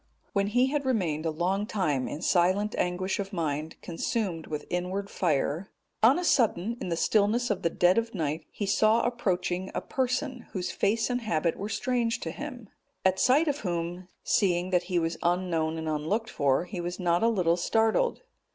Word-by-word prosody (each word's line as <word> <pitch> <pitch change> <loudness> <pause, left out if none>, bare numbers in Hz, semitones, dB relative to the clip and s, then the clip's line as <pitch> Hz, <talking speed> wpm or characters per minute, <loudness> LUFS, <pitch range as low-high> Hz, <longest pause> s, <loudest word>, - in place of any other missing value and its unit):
When 200 0 +1
he 245 +5 +3
had 295 -1 0
remained 175 - 0
a - - +2
long 185 +6 -1
time 150 -12 0
in 155 - -6
silent 190 +4 +2
anguish 185 +2 -1
of 195 0 -3
mind, 155 -3 -3
consumed 175 -1 -2
with 150 -1 -4
inward 185 +3 -2
fire,(228) 175 +7 0
on 270 - +3
a 360 - -2
sudden 230 - +2
in - - -3
the 170 - 0
stillness 215 +7 +2
of 200 - -1
the 170 - +1
dead 180 +5 +4
of 230 -1 -5
night 155 -2 -2
he 205 - -4
saw 215 +3 +3
approaching 190 -6 -1
a - - -1
person, 260 0 -2
whose 185 -2 -2
face 220 +4 +1
and 245 0 -1
habit 170 -6 0
were 205 - -5
strange 240 -1 0
to 165 - -3
him, 250 - -7 0.4
at 190 0 +3
sight 290 +6 +4
of 290 0 0
whom, 175 -1 -3 0.2
seeing 180 -2 +1
that 180 -1 +2
he 180 - +1
was 165 0 0
unknown 170 -2 0
and 160 0 -4
unlooked 160 +9 -1
for, 140 +3 +1
he 180 -1 -5
was 175 +2 -4
not 175 -1 +2
a 230 - +4
little 180 -7 +2
startled. 225 - +1
185 Hz, 190 wpm, -28 LUFS, 170-225 Hz, 0.4 s, dead